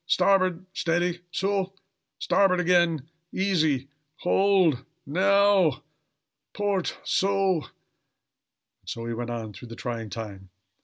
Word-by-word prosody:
starboard! 185 -1 +2
steady! 175 0 0
so! 195 +1 -1 0.4
Starboard 195 -2 +2
again! 170 -5 +2 0.2
Easy! 160 -9 +1 0.3
hold! 180 -7 +2 0.2
Now! 190 -2 +3 0.7
port 200 -3 -1
so!" 195 -3 +1
And - - -13 1.2
so 115 - -5
he 115 - -3
went 120 +1 -4
on 115 -3 -5
through 120 - -11
the 115 - -9
trying 115 -2 -5
time. 100 -3 -7
175 Hz, 105 wpm, -26 LUFS, 125-195 Hz, 1.2 s, Now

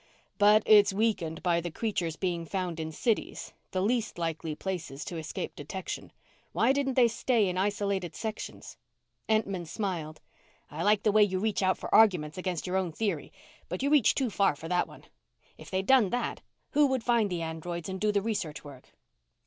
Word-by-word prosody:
"But 210 +1 +6
it's 205 -1 +7
weakened 190 -6 -1
by 170 -2 +2
the 175 - -4
creatures 170 -3 -2
being 175 -2 -2
found 175 -1 -3
in 160 0 -4
cities 220 +8 -2 0.2
the 185 0 -1
least 230 -1 0
likely 165 -2 -3
places 160 -6 -5
to 175 - -5
escape 160 - -5
detection. 185 +6 -6 0.4
Why 265 - +3
didn't 270 -2 0
they 245 -2 +6
stay 230 -2 +1
in 180 - -2
isolated 195 -3 -1
sections?" 220 +3 -6 0.5
Entman 200 -6 0
smiled. 165 -5 -4 0.5
"I 155 - -5
like 205 +2 +3
the 210 - +3
way 215 +1 +5
you 195 -2 +3
reach 210 +1 0
out 185 -1 +2
for - - -6
arguments 180 -7 +4
against 180 -3 -3
your 185 +1 0
own 185 -3 -1
theory, 185 -3 -2 0.4
but 180 +8 -3
you 280 - +1
reached 290 -7 +4
too 260 -5 0
far 195 -6 +2
for 160 +3 -8
that 180 +1 +1
one. - - -14 0.6
If - - -11
they'd 190 0 -1
done 255 -6 +5
that, 245 +4 -2 0.3
who 295 0 +4
would 260 -3 -1
find 235 -4 +2
the 175 -2 -2
androids 165 +1 -5
and 190 -1 -5
do 210 0 +3
the 200 -1 0
research 195 -9 -3
work?" 140 -3 -13
190 Hz, 190 wpm, -29 LUFS, 170-215 Hz, 0.6 s, it's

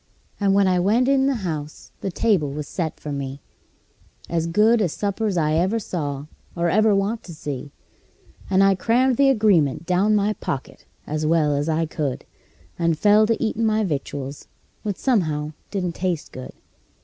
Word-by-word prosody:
And 195 -1 +2
when 200 -1 +4
I 180 -1 +2
went 220 +8 +2
in 270 -1 +3
the 275 - +1
house 155 -3 -5
the - - -2
table 185 -7 +1
was 150 +1 -5
set 165 -4 -4
for 150 - -6
me 140 -1 -4 0.9
As 165 -1 0
good 215 +6 +4
a 185 - +2
supper's 200 +2 -2
I 155 -2 +1
ever 185 +7 +2
saw, 145 -9 -4 0.3
or 170 -1 +1
ever 215 +1 +4
want 205 +3 0
to 170 - -9
see; 145 -2 -6 0.8
And 195 0 +4
I 195 0 +5
crammed 240 +6 +2
the 275 -1 +5
agreement 195 - +2
down 190 +4 +2
my 210 +1 +2
pocket 140 -9 -6 0.2
as 155 0 -2
well 155 -3 +2
as 145 +3 -1
I 160 +1 +1
could, 150 -4 -3 0.5
And 165 -2 +1
fell 210 +4 +5
to 230 - +1
eatin' 225 0 -1
my 220 0 +2
victuals, 140 -4 -4 0.3
which 205 -3 -3
somehow 155 - 0 0.2
didn't 180 -4 -2
taste 180 -3 -3
good. 130 0 -9
180 Hz, 175 wpm, -22 LUFS, 150-215 Hz, 0.9 s, I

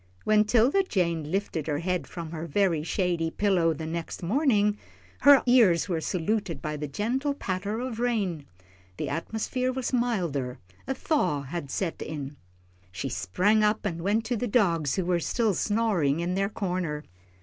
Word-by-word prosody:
When 215 0 +4
'Tilda 245 - +4
Jane 170 -6 0
lifted 180 -5 -2
her 150 -2 0
head 180 +2 -2
from 165 -2 -7
her 165 0 -5
very 170 -1 +2
shady 170 0 0
pillow 180 -3 +2
the 160 0 -4
next 165 +2 -5
morning, 210 - +2 0.4
her 285 -1 +7
ears 225 -10 +5
were 170 -4 -1
saluted 185 -1 -1
by 150 +1 -4
the 150 0 -4
gentle 250 - -1
patter 200 -1 -3
of 245 -2 -4
rain. 200 - -1 0.5
The - - -3
atmosphere 225 +8 -2
was 260 0 -3
milder 170 - 0 0.3
a 265 - -1
thaw 205 - 0
had 140 +1 -5
set 170 +3 -3
in. 145 -2 -5 0.6
She 90 - -4
sprang 205 - +2
up, 210 0 +1
and 170 -4 -2
went 210 +5 +1
to 240 +2 -1
the 245 +2 -2
dogs, 170 - +2
who 185 - -1
were 175 -1 +1
still 220 +5 +1
snoring 195 -9 +1
in 175 +1 -1
their 195 +1 0
corner. 180 -7 -3
185 Hz, 165 wpm, -27 LUFS, 165-220 Hz, 0.6 s, her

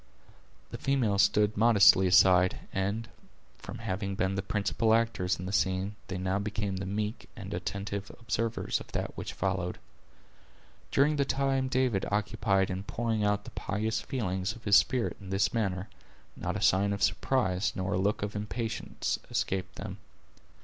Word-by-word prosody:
The - - -6
females 115 -8 +2
stood 105 +2 +3
modestly 105 -4 +6
aside, 90 0 +5 0.2
and, 100 +4 -1 0.5
from - - -8
having 100 -2 -3
been 95 0 0
the 100 - -1
principal 105 +3 +1
actors 105 -6 0
in 90 - -5
the 95 - -4
scene, 95 +1 0
they 95 - -4
now 95 +1 -1
became 100 -1 -2
the 95 +1 -4
meek 105 +2 -3
and - - -7
attentive 100 0 -4
observers 115 -1 -1
of - - -12
that - - -3
which - - -5
followed. 90 -1 -2 1.1
During 150 +2 +3
the 140 - +3
time 135 -1 0
David 130 -7 +1
occupied 100 -2 +1
in 95 +1 -3
pouring 110 +1 -2
out 105 0 +1
the - - -9
pious 110 +3 -2
feelings 95 -4 -2
of 115 - -14
his 100 -1 +5
spirit 125 +2 +3
in 95 - -9
this 95 0 +1
manner, 95 -4 -1 0.5
not - - -3
a - - -3
sign 100 +2 +3
of 100 - -2
surprise, 95 -7 +1
nor 95 +1 -2
a - - +1
look 100 +2 0
of 105 0 -4
impatience, 110 +2 -3
escaped 95 0 -2
them. - - -7
100 Hz, 165 wpm, -30 LUFS, 95-115 Hz, 1.1 s, modestly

